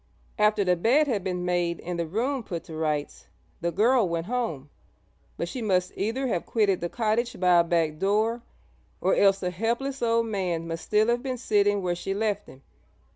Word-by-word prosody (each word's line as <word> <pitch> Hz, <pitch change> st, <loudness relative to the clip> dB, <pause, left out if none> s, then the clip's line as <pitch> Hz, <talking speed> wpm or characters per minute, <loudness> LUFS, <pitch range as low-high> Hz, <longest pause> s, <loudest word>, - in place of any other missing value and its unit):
After 210 Hz, -1 st, +3 dB
the 180 Hz, -1 st, +3 dB
bed 245 Hz, -, +3 dB
had 220 Hz, -9 st, -1 dB
been 180 Hz, -2 st, -2 dB
made 175 Hz, -1 st, 0 dB
and 175 Hz, 0 st, -4 dB
the 170 Hz, -, -1 dB
room 245 Hz, -, -1 dB
put 170 Hz, -7 st, -6 dB
to 160 Hz, -, -9 dB
rights, 150 Hz, -2 st, -3 dB, 0.3 s
the 170 Hz, -, 0 dB
girl 225 Hz, +2 st, +3 dB
went 165 Hz, 0 st, -2 dB
home, 200 Hz, -, -3 dB, 0.7 s
but 170 Hz, -, -2 dB
she 250 Hz, +8 st, -5 dB
must 185 Hz, -4 st, +1 dB
either 230 Hz, +7 st, -1 dB
have 205 Hz, -9 st, -1 dB
quitted 205 Hz, -5 st, +1 dB
the 175 Hz, -, -2 dB
cottage 230 Hz, +1 st, -1 dB
by 180 Hz, -1 st, +5 dB
a -, -, +5 dB
back 165 Hz, -2 st, 0 dB
door, 215 Hz, +4 st, +1 dB, 0.6 s
or -, -, +2 dB
else 195 Hz, -1 st, +4 dB
the 180 Hz, -2 st, -2 dB
helpless 235 Hz, +8 st, -2 dB
old 230 Hz, 0 st, +2 dB
man 180 Hz, -6 st, -2 dB
must 165 Hz, 0 st, -5 dB
still 215 Hz, +2 st, +2 dB
have 240 Hz, 0 st, +1 dB
been 260 Hz, -1 st, -3 dB
sitting 205 Hz, -3 st, +2 dB
where 175 Hz, -1 st, 0 dB
she 195 Hz, +2 st, -4 dB
left 210 Hz, -1 st, -1 dB
him. 130 Hz, +1 st, -15 dB
195 Hz, 195 wpm, -26 LUFS, 170-230 Hz, 0.7 s, by